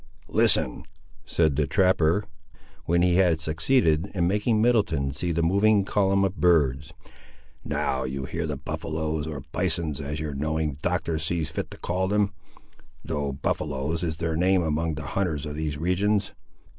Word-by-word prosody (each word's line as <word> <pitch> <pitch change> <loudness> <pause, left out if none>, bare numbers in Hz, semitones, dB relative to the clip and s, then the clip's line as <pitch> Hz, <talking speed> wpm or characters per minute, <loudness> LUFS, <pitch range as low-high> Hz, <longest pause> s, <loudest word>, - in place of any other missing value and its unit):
"Listen," - - +3 0.4
said 80 -4 +1
the 75 -2 +1
trapper, 90 +2 +3 0.6
when 85 +1 +2
he 90 -1 +3
had 90 -4 +3
succeeded 80 - +1
in 85 -2 +2
making 105 +3 +1
Middleton 100 - +2
see 85 +4 -2
the 85 0 0
moving 100 +3 +3
column 100 -1 +2
of 95 0 -3
birds. 75 -4 +2 0.7
"Now 65 0 -1
you 65 +1 -4
hear 80 +4 -3
the 75 -2 -3
buffaloes, 80 +1 -3
or 75 -4 -6
bisons, 80 -4 -1
as 75 +2 -4
your 75 -2 -4
knowing 75 0 -2
Doctor 80 -2 -1
sees 80 0 -2
fit - - -4
to - - -11
call 90 +2 -1
them, 105 0 +1 0.7
though 70 -3 -2
buffaloes 75 +3 -2
is 80 -2 -2
their 80 -1 -2
name 90 +2 +3
among 80 +1 0
all 80 - -2
the 75 - -6
hunters 80 -6 -1
of 75 - -5
these 75 -1 -3
regions. 95 +5 0
80 Hz, 160 wpm, -25 LUFS, 75-90 Hz, 0.7 s, Listen